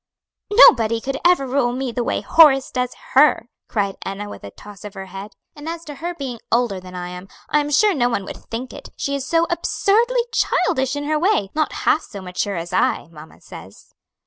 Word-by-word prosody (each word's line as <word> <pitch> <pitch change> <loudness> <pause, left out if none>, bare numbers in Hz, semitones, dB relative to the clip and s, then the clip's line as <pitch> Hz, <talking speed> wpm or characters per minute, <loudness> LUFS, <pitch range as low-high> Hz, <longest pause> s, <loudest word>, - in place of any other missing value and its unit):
"Nobody 230 - +6
could 270 +3 -4
ever 350 -6 +4
rule 255 -2 0
me 260 0 -3
the 240 +1 -2
way - - -1
Horace 280 -5 +5
does 250 -1 -2 0.2
her!" 270 -4 +4 0.2
cried 200 -3 -2
Enna, 195 +2 -5
with - - -10
a 100 - -7
toss 205 - -14
of 210 -1 -9
her 195 0 -7
head. 195 +2 -9 0.2
"And 295 +2 -7
as 335 0 -6
to 295 - -7
her 345 +4 -5
being 260 -7 -6
older 235 -5 +1
than 185 0 -12
I 180 0 -5
am, 180 +1 -9 0.2
I'm 295 -1 +1
sure 410 +8 +3
no 245 -6 +1
one 200 -5 -2
would - - -8
think 245 +3 -5
it; - - -10
she 280 - -2
is 280 -1 -3
so 335 0 +2
absurdly 460 +8 +1
childish 265 - +1
in 290 - -3
her 305 +1 0
way; 320 - +1
not 310 -1 0
half 310 - +3
so 205 - -10
mature 185 +2 -3
as 170 +1 -6
I, 185 - 0
mamma 155 -1 -14
says." - - -13
250 Hz, 210 wpm, -20 LUFS, 200-300 Hz, 0.2 s, Nobody